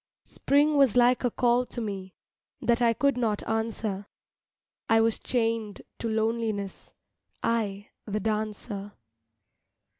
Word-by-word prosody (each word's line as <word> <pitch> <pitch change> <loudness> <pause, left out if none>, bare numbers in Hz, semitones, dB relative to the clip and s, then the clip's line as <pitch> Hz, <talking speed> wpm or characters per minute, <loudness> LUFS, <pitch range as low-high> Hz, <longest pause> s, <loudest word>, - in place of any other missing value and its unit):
Spring 290 +2 +2
was 270 -5 +5
like 245 +1 +4
a 245 - +3
call 240 +1 +2
to 245 - -7
me 195 -4 -5 0.4
That 235 0 +1
I 235 -1 +5
could 275 +2 +1
not 220 -4 -1
answer, 220 -3 -2 0.8
I 225 - +5
was 225 0 +2
chained 225 -4 -1 0.2
to 230 - -2
loneliness, 220 -2 -2 0.5
I, 205 -3 -1 0.2
the 210 0 -1
dancer. 210 -1 -3
225 Hz, 120 wpm, -27 LUFS, 210-240 Hz, 0.8 s, was